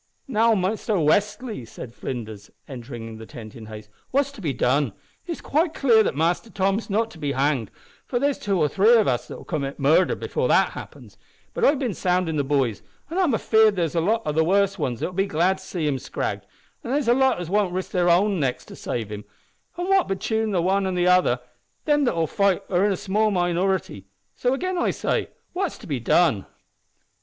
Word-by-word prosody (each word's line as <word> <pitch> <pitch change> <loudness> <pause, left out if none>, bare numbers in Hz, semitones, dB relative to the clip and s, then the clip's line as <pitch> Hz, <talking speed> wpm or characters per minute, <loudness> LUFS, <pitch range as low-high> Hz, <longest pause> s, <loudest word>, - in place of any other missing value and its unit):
"Now, 230 -2 +3
Mister 210 +3 -1
Westly," 205 - 0
said 115 +1 -9
Flinders, 110 -6 -6 0.2
entering 120 -4 -8
the 110 - -10
tent 110 +1 -10
in 110 -3 -10
haste, 110 -1 -9 0.2
"what's 280 +1 +1
to 280 - -12
be 155 -6 -1
done? 130 -2 +1 0.3
It's 335 - -5
quite 320 +3 0
clear 235 -5 +5
that 210 - 0
Mister 170 +8 0
Tom's 195 +2 -1
not 225 +3 0
to 160 - -13
be 145 -2 -2
hanged, 135 -5 0 0.4
for 245 - -1
there's 280 +2 0
two 200 -2 0
or 150 - +3
three 205 +10 +4
of 220 -3 +4
us'll 125 -2 -2
commit 140 -4 -4
murder 155 +6 +3
before 480 +2 -2
that - - +3
happens; - - -11 0.3
but - - -3
I've 290 - +5
bin 255 -6 -2
soundin' 180 -2 0
the 145 - +1
boys, 135 -7 0 0.3
an' 355 - -1
I'm 330 -11 +3
afeared 220 -1 +4
there's 170 -4 -1
a 165 - +1
lot 220 +6 +1
o' 150 - 0
the 160 +2 +2
worst 195 +3 +2
wans 120 -3 -2
that'll 185 - -2
be 195 +2 0
glad 185 +2 +1
to - - -13
see 175 -5 -3
him 135 -3 0
scragged, - - -4 0.4
an' - - -6
there's 275 -1 0
a 240 - +6
lot 265 -4 +2
as 175 -1 -6
won't 205 -2 +2
risk 185 +1 -4
their 180 -2 +2
own 190 +2 +3
necks 135 -4 -1
to - - -11
save 110 -3 -4
him, 105 0 -6 0.5
an' 355 +1 -2
what 390 -1 +3
betune 220 +3 -1
the 180 -4 0
wan 195 +2 +1
an' 185 - -2
the 175 0 +1
other, 180 -9 +4 0.5
them 295 -2 +3
that'll 170 -9 +1
fight 195 +3 +1
for 180 - -1
him 205 - +3
are - - +2
a - - -4
small 210 +4 +1
minority 175 - -1 0.3
so, 250 - 0
again 370 +5 -2
I - - +1
say, - - -1 0.2
what's 370 -2 -2
to - - -13
be 140 -5 -2
done?" 120 - +2
185 Hz, 215 wpm, -24 LUFS, 145-220 Hz, 0.5 s, a